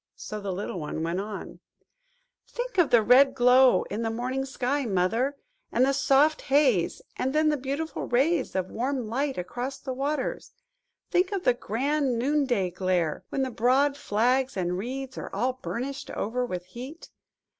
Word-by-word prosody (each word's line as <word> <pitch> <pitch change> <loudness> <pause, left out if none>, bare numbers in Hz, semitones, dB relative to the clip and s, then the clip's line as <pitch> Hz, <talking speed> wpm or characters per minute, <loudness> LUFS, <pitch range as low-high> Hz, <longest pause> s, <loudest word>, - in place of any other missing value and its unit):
So 215 - -6
the 200 -1 -3
little 185 -1 -4
one 155 +1 -4
went 170 +3 -1
on– 210 0 -7 0.9
"Think 485 -5 -4
of 335 - +4
the 235 -2 +5
red 270 +3 +6
glow 250 +1 +5
in 210 +3 -5
the 225 - -1
morning 255 +4 -2
sky, 270 +1 -1
Mother, 225 +7 0 0.3
and 250 +2 +3
the 275 - +2
soft 280 +3 +3
haze–and 265 - +1
then 310 0 +4
the 300 - +2
beautiful 280 +4 -4
rays 275 - +1
of 185 -1 -2
warm 255 0 -2
light 270 +4 -1
across 245 +9 -4
the 260 - -5
waters! 275 - -3 0.6
Think 365 +2 +2
of 390 -3 -2
the 250 - +4
grand 260 +3 -1
noonday 250 -7 +1
glare, 180 -3 -1
when 270 - -1
the 260 - -2
broad 265 +5 +2
flags 255 +1 +1
and 180 -1 -1
reeds 260 +6 -5
are - - -6
all 255 +5 -1
burnished 270 +3 -4
over 245 +4 -2
with 180 -4 -5
heat. 260 - -10
255 Hz, 165 wpm, -27 LUFS, 220-275 Hz, 0.9 s, red